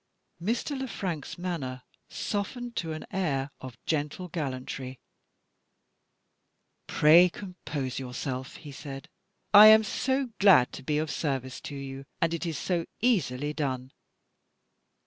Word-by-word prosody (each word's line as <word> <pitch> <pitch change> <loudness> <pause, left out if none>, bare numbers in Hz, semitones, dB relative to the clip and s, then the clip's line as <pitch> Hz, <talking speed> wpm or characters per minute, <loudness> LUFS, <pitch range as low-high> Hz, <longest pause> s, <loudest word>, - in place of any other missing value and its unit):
Mr. 235 - -1
Le 265 0 -3
Frank's 170 - -4
manner 145 -8 -4 0.3
softened 235 +4 -3
to 165 -2 -2
an 155 0 -6
air 145 -8 -1
of 130 -2 -9
gentle 155 +4 -2
gallantry. 130 -4 -4 1.9
"Pray 170 +4 +6
compose 160 -9 -5
yourself!" 130 0 -5
he 150 -3 -10
said. 135 -1 -8 0.4
"I 210 +1 +11
am 220 0 +8
so 260 +4 -1
glad 185 -11 +6
to - - -7
be 150 +3 -1
of 155 -1 -1
service 135 -3 -3
to 145 - -7
you, 135 0 -7
and 165 -1 +1
it 170 +1 -2
is 160 -3 -3
so 170 +2 -1
easily 150 - +1
done!" 130 -4 -3
155 Hz, 125 wpm, -28 LUFS, 135-185 Hz, 1.9 s, I